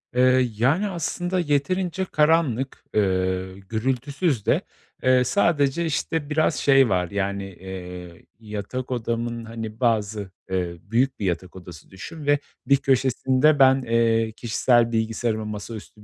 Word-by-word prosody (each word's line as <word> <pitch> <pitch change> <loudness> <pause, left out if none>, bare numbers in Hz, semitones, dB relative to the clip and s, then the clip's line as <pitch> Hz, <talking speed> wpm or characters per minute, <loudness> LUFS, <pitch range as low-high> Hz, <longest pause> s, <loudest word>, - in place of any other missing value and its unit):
Eee, 130 0 +4
yani, 150 - +2
aslında 175 +1 -2
yeterince 175 +4 0
karanlık, 150 -6 +1
eee, 95 -2 0 0.2
gürültüsüz 130 - -1
de, - - +2 0.4
eee, 130 0 +4
sadece, 150 +1 +1
işte, 155 0 -2
biraz 155 +1 +2
şey 135 -3 +4
var, 90 -1 0
yani, 100 0 -2
eee, 90 -2 -9
yatak 110 +4 -6
odamın, 115 -1 -3
hani, 110 -1 -7
bazı, 105 -5 0 0.2
eee, 90 -2 -2
büyük 125 +6 0
bir 100 - -2
yatak 90 0 -3
odası 90 -4 -12
düşün 150 - -9
ve 145 0 +3 0.3
bir 140 - +4
köşesinde 130 +2 +2
ben, 135 0 +6
eee, 115 -2 +1
kişisel 120 0 +2
bilgisayarıma, 110 -1 -1
masaüstü 105 0 -8
120 Hz, 125 wpm, -24 LUFS, 105-140 Hz, 0.4 s, ben